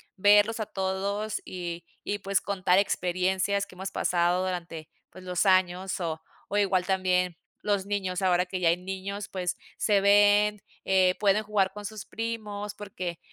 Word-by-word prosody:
verlos 205 +3 +4
a - - -1
todos, 200 +2 -2
y 175 -2 -5 0.2
y 205 - -2
pues 195 -1 0
contar 190 -2 +2
experiencias 190 +1 0
que - - -16
hemos 190 +1 -5
pasado 175 +1 +1
durante 170 -4 -5 0.2
pues 185 - -13
los 180 +2 0
años. 185 0 +2
O 160 -2 -3 0.3
o, 205 - -4
igual 190 -3 +2
también 185 -2 +1 0.3
los 200 -2 0
niños 195 -2 -2
ahora 180 -1 +3
que 185 0 -5
ya 170 - +4
hay 170 - +3
niños 190 +2 -5
pues 180 -2 -3 0.2
se 205 -2 +3
ven, 205 +1 +5 0.2
eh, 185 -1 +4
pueden 210 +1 +3
jugar 200 -2 +1
con 210 0 -8
sus 215 -1 -7
primos 210 -2 -4
porque 185 -5 -6
190 Hz, 160 wpm, -27 LUFS, 180-205 Hz, 0.3 s, ven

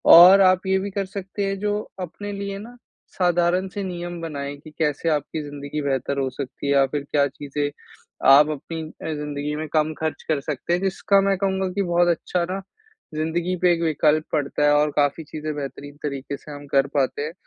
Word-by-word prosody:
और 185 +4 +10
आप 185 0 +4
ये 190 0 +3
भी 200 +1 -3
कर 195 0 -2
सकते 195 +1 -4
हैं 195 0 -1
जो 210 0 0 0.2
अपने 205 +4 -6
लिए 200 0 -4
ना, 235 +4 -10 0.3
साधारण 175 +1 +1
से 200 +1 -5
नियम 175 -1 -5
बनाएँ 145 -3 -4
कि 155 +2 -13
कैसे 155 +1 +1
आपकी 150 +1 -1
ज़िंदगी 145 +1 -5
बेहतर 140 0 -1
हो 135 -1 0
सकती 135 +1 -6
है 140 - +3
या 135 -1 +5
फिर 145 +1 -3
क्या 140 -1 +3
चीज़ें 145 +1 -3 0.6
आप 145 +3 +8
अपनी 160 +2 -5 0.2
अ, 160 - -2
ज़िंदगी 150 0 -3
में 155 +1 -4
कम 155 0 +2
खर्च 160 0 -3
कर 155 -2 +2
सकते 150 +4 -2
हैं, 180 - +1
जिसका 195 +1 +2
मैं 195 -1 +2
कहूँगा 190 -1 0
कि 200 - 0
बहुत 175 0 +2
अच्छा 175 +1 0
ना, 195 +1 -3 0.5
ज़िंदगी 165 +3 -1
पे 180 - +6
एक 170 - -2
विकल्प 155 0 +2
पड़ता 145 -1 0
है 145 - +5
और 150 0 +3
काफ़ी 145 +2 +2
चीज़ें 155 0 -5
बेहतरीन 145 0 -7
तरीके 140 -1 -4
से 150 - -12
हम 145 0 -8
कर 135 0 +4
पाते 135 +1 +1
हैं। 155 +2 -4
155 Hz, 205 wpm, -23 LUFS, 145-185 Hz, 0.6 s, और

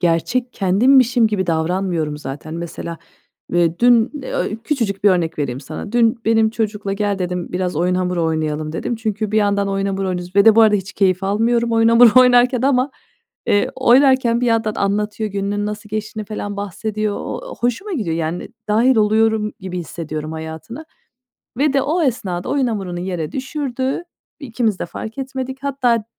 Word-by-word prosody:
Gerçek 185 +9 0
kendimmişim 235 +5 +4
gibi 200 -4 -1
davranmıyorum 165 -2 -1
zaten. 150 +2 -7
Mesela, 170 -1 -6 0.5
ve 170 -1 +1
dün, 240 -1 +5
eee, 215 -4 -2
küçücük 220 -9 -2
bir 205 - +7
örnek 165 -3 0
vereyim 130 -2 -2
sana. 155 - -8
Dün 230 0 +2
benim 225 0 +3
çocukla, 210 -3 -2
"Gel." 200 -1 -1
dedim, 180 -1 -3
"Biraz 180 -3 -2
oyun 180 +2 +1
hamuru 180 -2 0
oynayalım." 155 -1 -2
dedim. 235 +7 -3
Çünkü 215 -1 -3
bir 215 - +2
yandan 200 -1 +1
oyun 195 0 -1
hamuru 195 -1 -2
oynuyoruz 180 +1 -5
ve 200 - +6
de 220 -1 +7
bu - - +7
arada 210 -1 +5
hiç 195 +1 -6
keyif 185 -1 +1
almıyorum 230 +4 +1
oyun 225 0 +4
hamuru 235 +1 +7
oynarken 250 0 +4
ama, 265 0 +2 0.6
eee, 205 - +2
oynarken 260 -2 +4
bir 245 - +1
yandan 225 -2 +1
anlatıyor, 210 +1 -1
gününün 200 +1 -2
nasıl 210 0 -6
geçtiğini 215 0 -4
falan 205 -1 -5
bahsediyor. 210 +1 -3
Ooo, - - -6
hoşuma 245 - -1
gidiyor, 185 - -2
yani, 165 +2 -3 0.2
dâhil 230 +4 +3
oluyorum 215 0 +2
gibi 185 -1 -5
hissediyorum 155 -2 -5
hayatına 160 - -7 0.7
ve 290 0 +2
de 275 -1 +2
o 325 +4 0
esnada 190 - -2
oyun 275 -3 +1
hamurunu 190 -6 -3
yere 175 -4 -4
düşürdü. 265 +1 -3 0.4
İkimiz 230 -6 -1
de - - -3
fark 220 +8 -8
etmedik. 265 0 -5
Hatta 255 -4 +1
d 210 - -15
210 Hz, 170 wpm, -19 LUFS, 180-240 Hz, 0.7 s, bir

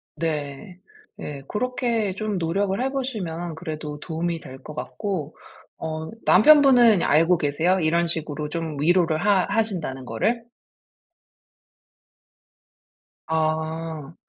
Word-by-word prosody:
네. 155 +3 -4 0.4
네. 140 -2 -6
고렇게 230 -3 -1
좀 215 -2 -2
노력을 190 +5 0
해 270 - -1
보시면 180 - -4
그래도 155 -3 -6
도움이 165 +1 -3
될 130 -2 -10
것 150 - -8
같고. 180 -5 -4 0.4
어 160 0 -4 0.2
남편분은 245 - +6
알고 165 +4 +4
계세요? 160 +6 +1
이런 170 +1 +2
식으로 150 -2 -3
좀 160 -3 -4
위로를 170 -1 +3
하 200 -2 +3
하신다는 175 - -2
거를? 225 - 0 2.9
아. 160 -1 -2
165 Hz, 210 characters per minute, -24 LUFS, 155-200 Hz, 2.9 s, 남편분은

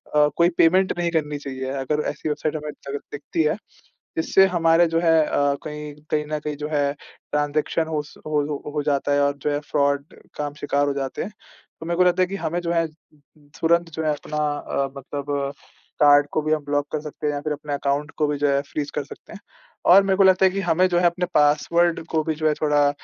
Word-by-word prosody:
अ, 150 0 +6
कोई 170 +1 +5
पेमेंट 185 +3 +4
नहीं 170 -1 0
करनी 150 -3 -1
चाहिए। 130 -2 -5 0.2
अगर 150 +1 0
ऐसी 150 - -4
वेबसाइट 155 +1 -2
हमें 150 0 -4
दग 140 0 -7
दिखती 150 +2 -2
है। 155 +6 +1 0.6
इससे 190 +4 +5
हमारे 170 -1 +4
जो 165 0 0
है 165 -1 +3
अ, 145 -1 +1
कहीं 150 -1 -6 0.2
कहीं 150 -1 +1
न 155 0 -2
कहीं 150 0 -4
जो 150 - -4
है 145 -2 +1 0.4
ट्रांज़ेक्शन 150 +2 0
हो 155 -2 -1
स 145 - -16
होल 150 -1 0 0.3
हो 150 - 0
जाता 145 -1 +1
है 145 - +3
और 140 0 +2
जो 150 - +1
है 145 - 0
फ्रॉड 140 0 +1 0.3
का 150 - -2
आप 145 0 -6
शिकार 145 -1 0
हो 140 - 0
जाते 135 -1 -3
हैं। 210 - -7 0.5
तो - - -6
मेरे 170 0 -2
को 185 - +5
लगता 180 +1 +3
है - - 0
कि 195 - -5
हमें 175 0 -2
जो 170 0 -2
है 165 -1 +2 0.7
तुरंत 170 +1 +2
जो 160 +1 -4
है 155 - +2
अपना 150 +1 -6 0.2
अ, 140 0 -2
मतलब 140 +1 -6 0.7
कार्ड 145 0 +6
को 155 - +1
भी 155 - +1
हम 155 -1 -1
ब्लॉक 145 0 0
कर 155 - -1
सकते 150 0 -5
हैं 145 - 0
या 145 - -3
फ़िर 155 0 -2
अपने 145 0 -5
अकाउंट 140 +1 -1
को 150 - +2
भी 145 -1 -1
जो 145 0 +1
है 140 0 +2
फ्रीज 145 -1 -3
कर - - -3
सकते - - -13
हैं। 200 - -9 0.5
और 195 +2 +8
मेरे 195 -1 +1
को 195 - +5
लगता 190 0 +5
है 190 - +4
कि 195 - -3
हमें 180 +1 +3
जो 175 -1 +2
है 175 - +2
अपने 175 +1 +2
पासवर्ड 160 +3 +3
को 160 -1 +1
भी 160 -1 -2
जो 155 0 0
है 150 - +3
थोड़ा 145 -1 +3
150 Hz, 240 wpm, -23 LUFS, 145-165 Hz, 0.7 s, और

